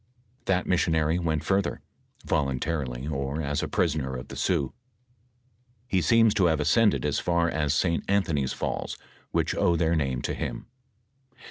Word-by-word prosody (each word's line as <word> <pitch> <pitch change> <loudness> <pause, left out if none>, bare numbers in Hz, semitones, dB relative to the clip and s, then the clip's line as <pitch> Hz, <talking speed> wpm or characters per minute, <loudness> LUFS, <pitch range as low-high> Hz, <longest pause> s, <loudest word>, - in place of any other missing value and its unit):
That 90 -1 +1
missionary 80 -2 +2
went 80 -3 -1
further; 95 +2 0 0.5
voluntarily 70 -3 -1
or 70 0 -2
as 75 -2 -1
a - - -2
prisoner 75 -6 0
of 60 - -7
tbe - - -8
Sioux, 70 -2 0 1.1
he 95 -7 +1
seems 115 +5 +4
to 100 -4 +3
have 80 -3 +2
ascended 105 +4 +3
as 75 - +1
far 85 -1 +1
as 75 -3 0
St. 85 -1 +1
Anthony's 80 -10 +1
falls, - - -3 0.3
which - - 0
owe 85 - +2
their 85 0 +2
name 65 -5 -1
to - - -1
him. - - -4
80 Hz, 150 wpm, -27 LUFS, 70-90 Hz, 1.1 s, seems